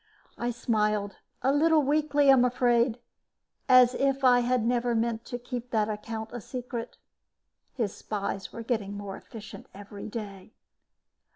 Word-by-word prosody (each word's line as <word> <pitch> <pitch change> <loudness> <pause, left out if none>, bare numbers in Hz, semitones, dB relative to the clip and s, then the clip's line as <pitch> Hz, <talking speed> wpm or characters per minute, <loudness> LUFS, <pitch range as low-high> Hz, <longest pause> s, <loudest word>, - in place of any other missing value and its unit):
I 240 - -2
smiled, 210 -4 0 0.3
a 265 +2 +3
little 310 +1 +4
weakly, 290 0 +3
I'm 260 -2 +6
afraid, 245 -1 +2 0.7
as 255 -1 +7
if 275 0 0
I 250 -1 +6
had 245 -1 +1
never 240 0 +1
meant 230 0 -1
to 245 - -5
keep 245 0 -6
that 220 -2 +1
account 220 +1 -5
a 240 - -5
secret. 245 0 -6 0.8
His 225 -6 -1
spies 200 -2 -4
were 230 - -7
getting 215 -4 -2
more 200 -1 -6
efficient 215 -2 -11
every 205 +1 -9
day. 205 -2 -8
235 Hz, 145 wpm, -28 LUFS, 215-250 Hz, 0.8 s, as